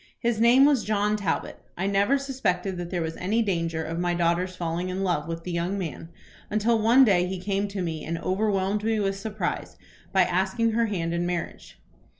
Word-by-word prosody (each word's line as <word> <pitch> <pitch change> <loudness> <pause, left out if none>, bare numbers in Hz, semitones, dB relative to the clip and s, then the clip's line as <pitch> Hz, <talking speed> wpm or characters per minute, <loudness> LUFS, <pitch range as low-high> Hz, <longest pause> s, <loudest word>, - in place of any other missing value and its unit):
His 235 -2 0
name 245 +4 +7
was 285 -5 +3
John 210 0 +1
Talbot. 200 -5 -2 0.2
I 185 - -1
never 200 +7 +3
suspected 200 -9 -2
that 175 -1 -5
there 175 -2 -1
was 160 0 -4
any 215 +6 +1
danger 165 -5 -1
of 165 +1 -4
my 175 0 0
daughter's 175 +2 0
falling 175 +1 -3
in 185 +1 -2
love 170 -5 0
with 165 0 -5
the 180 - -5
young 175 +3 -1
man, 165 -3 -5 0.4
until 220 +2 +2
one 240 +5 +6
day 180 -5 +3
he 190 +1 -3
came 200 +2 -1
to 200 -2 -4
me 160 -3 -4
and 165 +1 -3
overwhelmed 195 +2 0
me 220 0 +1
with 195 -1 -1
surprise 215 +1 -4 0.3
by 190 -1 +5
asking 190 +6 +1
her 230 +1 +1
hand 170 -5 -2
in 170 +1 -1
marriage. 175 -1 -5
190 Hz, 200 wpm, -26 LUFS, 175-215 Hz, 0.4 s, name